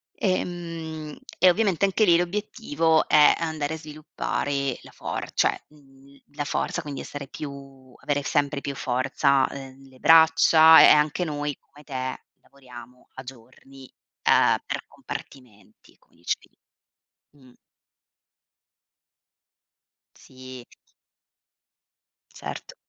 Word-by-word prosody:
ehm, 165 -5 -4 0.2
e 185 +1 +6
ovviamente 200 -1 +1
anche 195 +3 +1
lì 170 -3 +5
l'obiettivo 175 - 0
è 150 -1 +6
andare 160 -2 -3
a - - -7
sviluppare 145 -3 -4
la - - -15
for - - -6
cioè, - - +1
mhmm, 140 -2 -21 0.2
la 145 - -3
forza, 160 +4 -3
quindi 145 -4 -7
essere 145 -1 -8
più 135 -2 -10
avere 145 -1 -2
sempre 140 0 -1
più 140 - -5
forza, 135 +2 +1
ehm, 135 0 -11
le 130 -1 -20
braccia 160 0 +6
e - - +8
e - - +8
anche 150 +4 +3
noi 145 -2 -4
come 150 +1 -20
te, 130 -2 -5 0.2
lavoriamo 125 -2 -15
a 130 - -9
giorni, 130 +2 -15 0.3
ehm, - - +4
per - - -5
compartimenti, 125 -6 -12
come - - -32
dicevi - - -4 0.8
di 145 - -27
mh. 130 -1 -19 2.6
Sì. 130 -1 -13 1.7
Certo. - - -8
145 Hz, 115 wpm, -24 LUFS, 135-160 Hz, 2.6 s, e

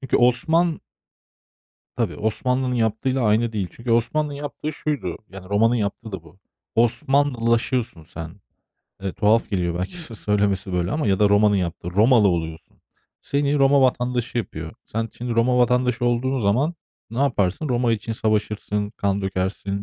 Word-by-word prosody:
Çünkü 135 - +1
Osman 160 +7 +2 1.2
Tabii, 115 -4 -1
Osmanlı'nın 125 +4 -1
yaptığıyla 120 +3 0
aynı 110 +1 +2
değil. 100 -4 -1
Çünkü 115 0 -5
Osmanlı'nın 145 +6 +1
yaptığı 145 +1 -5
şuydu. 140 - -3
Yani, 95 0 -11
Roma'nın 115 +4 +3
yaptığı 110 0 -3
da 95 -4 -6
bu. 85 +3 -18 0.4
Osmanlılaşıyorsun 120 - +1
sen. 80 +4 -9 0.6
Eee, 95 -1 -2
tuhaf 105 +3 +2
geliyor 85 -3 -1
belki 95 - -4
sö 155 -9 -7
söylemesi 100 -2 0
böyle 90 0 0
ama. 155 -3 -1
Ya 95 -2 +2
da 105 -1 +4
Roma'nın 105 0 +4
yaptığı, 85 -1 -3
Romalı 110 +3 +5
oluyorsun. 80 -2 -3 0.4
Seni 145 +1 0
Roma 140 0 +5
vatandaşı 125 -1 0
yapıyor. 115 - -5
Sen 115 +1 -3
şimdi 120 -1 -4
Roma 125 +2 +3
vatandaşı 125 0 +2
olduğun 125 +2 +1
zaman 125 +11 +1 0.4
ne 115 - -5
yaparsın? 135 - +1
Roma 120 -2 +2
için 115 +1 -3
savaşırsın, 105 -1 -1
kan 100 -2 -1
dökersin 95 +1 -2
115 Hz, 150 wpm, -23 LUFS, 100-125 Hz, 1.2 s, Romalı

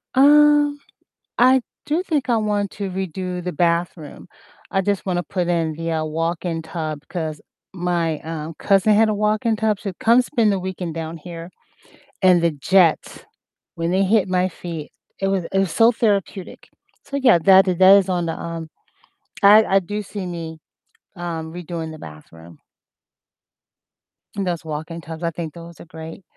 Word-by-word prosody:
Um, 295 +1 +5 0.6
I 255 +2 +5 0.3
do 315 +4 0
think 305 -8 -2
I 240 - +3
want 205 -2 -1
to 200 -2 -5
redo 185 -1 -4
the 180 +1 -4
bathroom, 170 -1 -2 0.4
I 195 - +1
just 200 0 -2
wanna 175 -2 0
put 180 0 -3
in 165 -2 0
the, 165 +1 -4
uh, 160 -1 -1
walk-in 165 +1 -2
tub 160 -2 -5
'cause 160 -4 -4 0.3
my, 175 -3 -1
um, 160 0 -6
cousin 200 +1 +3
had 220 +1 +4
a 215 - 0
walk-in 215 +2 +1
tub, 215 -1 0
she 205 - -6
would 180 - -15
come 235 +2 +5
spend 235 -4 +1
the 195 - 0
weekend 180 -3 -5
down 165 0 -5
here, 170 +1 -9 0.7
and 180 -2 +5
the 170 - +3
jets, 165 +4 +1 0.5
when 165 +1 -2
they 190 +2 +2
hit 200 0 +2
my 185 0 +1
feet, 165 -3 -8 0.3
it 195 - 0
was 195 -3 0
it 195 - +2
was 195 -4 0
so 230 +5 +5
therapeutic, 200 -4 -2 0.4
so 280 - -5
yeah, 255 -8 +5
that 190 +3 +6
that 185 +1 +6
is 195 -1 +1
on 175 -2 0
the, 165 - -2
um 165 -1 -6 0.7
I 210 +2 +8
I 195 - +3
do 205 +3 -5
see 200 -1 -7
me, 165 -2 -6 0.6
um, 165 -2 -5
redoing 170 -2 -6
the 155 - -10
bathroom 80 - -13 1.8
and 200 -2 -2
those 170 -2 -3
walk-in 160 +2 -5
tubs, 160 0 -9
I 170 - +1
think 160 -2 -6
those 170 0 -12
are - - -11
great, 160 +2 -10
180 Hz, 170 wpm, -21 LUFS, 165-200 Hz, 1.8 s, I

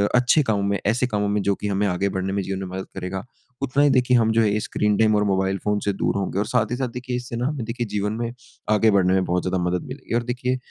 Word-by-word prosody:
अच्छे 125 +5 +4
कामों 105 -5 0
में 100 0 0
ऐसे 120 +5 +2
कामों 105 -3 -1
में 105 0 +1
जो 100 0 +1
कि 105 - -4
हमें 100 0 0
आगे 95 +1 0
बढ़ने 95 0 -2
में 100 - 0
जीवन 95 0 -3
में 95 - -4
मदद 95 - -4
करेगा, 95 0 -4 0.4
उतना 140 +1 +2
ही 145 - +5
देखिए 125 -2 +4
हम 110 -1 +3
जो 115 +1 +3
है 105 -1 +2
स्क्रीन 105 -1 0
टाइम 110 -1 +4
और 105 - +3
मोबाइल 95 -1 +1
फ़ोन 105 0 +1
से 100 - +2
दूर - - -1
होंगे। 95 0 -2
और 105 - +1
साथ 120 0 0
ही - - +1
साथ 130 0 -1
देखिए 125 +1 -5
इससे 125 -1 -5
ना 120 +2 -1
हमें 145 -4 -3
देखिए 120 +1 -3
जीवन 105 0 -1
में 120 0 -2 0.4
आगे 110 +1 +4
बढ़ने 95 -2 +3
में 95 -1 +2
बहुत 90 0 0
ज़्यादा 95 0 0
मदद 90 0 -1
मिलेगी। 130 -2 -5
और 120 - +1
देखिए 125 +1 -1
105 Hz, 280 wpm, -23 LUFS, 95-120 Hz, 0.4 s, ही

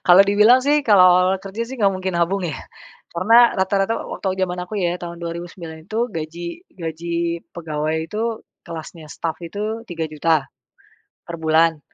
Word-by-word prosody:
Kalau 180 +2 +9
dibilang 210 +6 +5
sih, 295 +1 +3
kalau 205 -4 +7
awal-awal 185 +1 +3
kerja 200 +4 -5
sih 265 - -7
nggak 200 -3 +4
mungkin 185 -1 -3
nabung 175 +3 +1
ya 150 - -4 0.5
karena 230 +7 +5
rata-rata 195 +2 +1 0.2
wa - - -5
waktu 190 -1 -3
jaman 180 -1 -1
aku 180 +4 -10
ya 175 -1 0
tahun 170 -1 -8
2009 170 -1 -7
itu 230 +6 -1
gaji 170 - -6 0.2
gaji 170 +1 -3
pegawai 160 0 -3
itu 220 +3 -2 0.2
kelasnya 160 -2 -9
staf 165 -1 -3
itu 215 +5 -4
3.000.000 160 - -1 0.8
per 170 - -6
bulan. 160 0 +3
175 Hz, 155 wpm, -21 LUFS, 165-200 Hz, 0.8 s, Kalau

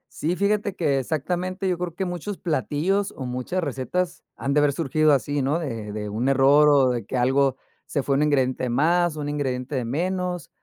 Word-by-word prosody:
Sí, 170 +4 -1
fíjate 205 0 0
que, 140 -5 +1
exactamente 180 +7 -2
yo 180 -2 0
creo 175 -2 -4
que, 190 +2 -3
muchos 180 +3 -4
platillos, 165 - -1
o, 130 - -6
muchas 125 +9 -2
recetas, 165 +6 -2
han 140 +1 -2
de 150 - +4
haber 145 -1 +3
surgido 155 0 +2
así, 140 +2 0
¿no? 145 +6 +1
De 115 -9 -5
de 105 0 -4
un 115 +6 -1
error, 140 +2 +5
o, 135 -3 +5
de 120 -4 -3
que 130 - -3
algo, 135 +1 +2 0.3
se 140 -3 -2
fue 140 - +1
un 145 - +2
ingrediente 130 -3 +1
más, 165 +5 +2
un 145 -1 -3
ingrediente 135 -2 -2
de 125 -2 -1
menos, 180 +4 -2
145 Hz, 200 wpm, -24 LUFS, 130-175 Hz, 0.3 s, error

